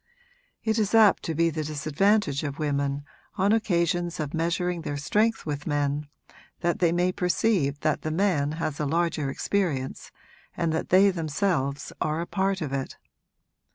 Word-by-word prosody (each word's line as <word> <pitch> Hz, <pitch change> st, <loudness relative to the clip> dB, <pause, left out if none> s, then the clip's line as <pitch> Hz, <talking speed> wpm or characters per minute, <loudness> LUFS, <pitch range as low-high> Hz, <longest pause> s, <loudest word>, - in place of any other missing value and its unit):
It 220 Hz, 0 st, +1 dB
is 210 Hz, +1 st, +1 dB
apt 220 Hz, -3 st, +6 dB
to 165 Hz, -, -2 dB
be 165 Hz, +1 st, +2 dB
the 155 Hz, 0 st, -3 dB
disadvantage 155 Hz, +3 st, +1 dB
of 140 Hz, -2 st, -4 dB
women, 140 Hz, -1 st, -1 dB, 0.3 s
on 200 Hz, 0 st, +2 dB
occasions 175 Hz, -5 st, +1 dB
of 150 Hz, -2 st, -3 dB
measuring 170 Hz, +1 st, -1 dB
their 145 Hz, -3 st, -4 dB
strength 215 Hz, +10 st, +1 dB
with 150 Hz, 0 st, -4 dB
men, 145 Hz, 0 st, 0 dB, 0.5 s
that 175 Hz, -1 st, 0 dB
they 170 Hz, -2 st, +3 dB
may 175 Hz, +1 st, +2 dB
perceive 180 Hz, -6 st, +1 dB
that 155 Hz, -2 st, 0 dB
the 155 Hz, -, -3 dB
man 155 Hz, -4 st, +1 dB
has 155 Hz, -3 st, -3 dB
a 150 Hz, -, 0 dB
larger 160 Hz, -2 st, 0 dB
experience 145 Hz, -4 st, -2 dB, 0.5 s
and 165 Hz, -2 st, 0 dB
that 160 Hz, -, -2 dB
they 195 Hz, +2 st, +6 dB
themselves 155 Hz, -4 st, -1 dB
are 155 Hz, +1 st, 0 dB
a 170 Hz, -, -2 dB
part 190 Hz, +1 st, -1 dB
of 145 Hz, -3 st, -3 dB
it. 135 Hz, -1 st, -3 dB
165 Hz, 160 wpm, -26 LUFS, 145-185 Hz, 0.5 s, apt